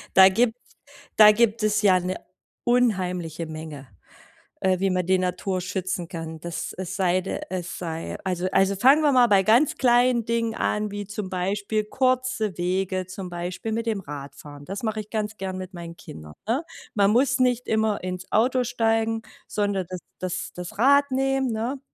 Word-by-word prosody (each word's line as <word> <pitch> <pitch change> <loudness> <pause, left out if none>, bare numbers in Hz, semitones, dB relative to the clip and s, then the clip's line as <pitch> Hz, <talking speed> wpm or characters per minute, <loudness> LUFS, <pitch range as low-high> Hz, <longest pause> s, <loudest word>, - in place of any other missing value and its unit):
da 190 0 +9
gibt 225 +3 +2 0.6
da 210 -1 +10
gibt 225 0 +2
es 215 0 +2
ja 185 -2 +5
'ne 185 +1 -3 0.5
unheimliche 180 -9 0
Menge, 155 -4 -8 0.7
äh, 185 -1 +2
wie 195 - +2
man 180 -1 0
die 185 0 +3
Natur 185 +1 -1
schützen 180 -1 -3
kann, 165 -2 -6
dass 170 0 -5
es 185 0 -5
sei 185 -1 +2
d 195 - -4
es 185 -1 -5
sei 165 -2 -5
also 185 -1 -1
also 195 0 +3
fangen 270 +9 +5
wir 290 - +4
mal 250 -2 +6
bei 200 -2 +5
ganz 235 +9 +4
kleinen 245 -2 +3
Dingen 230 -1 0
an, 210 -1 -1
wie, 205 0 -5
zum 205 -1 -5
Beispiel, 200 +4 -1
kurze 255 -5 0
Wege, 185 +1 -1
zum 185 -1 -7
Beispiel, 175 +5 -4
mit 230 +1 -2
dem 215 -3 -1
Radfahren. 145 -1 -9
Das 195 +5 -5
mache 215 -1 -2
ich 210 - -9
ganz 215 -1 -3
gern 190 -1 -4
mit 185 +1 -7
meinen 170 -1 -8
Kindern, 75 - -11
ne? 240 +8 0 0.3
Man 200 -1 +4
muss 260 +2 +3
nicht 250 -1 +1
immer 220 -2 +1
ins 185 0 -5
Auto 250 +3 +3
steigen, 225 -1 0 0.2
sondern 200 -3 -1
das 185 -1 -6 0.2
das 185 0 -4
das 180 0 -7
Rad 280 +4 +5
nehmen, 270 -1 +1
ne? 240 +5 -3
200 Hz, 180 wpm, -24 LUFS, 180-230 Hz, 0.7 s, da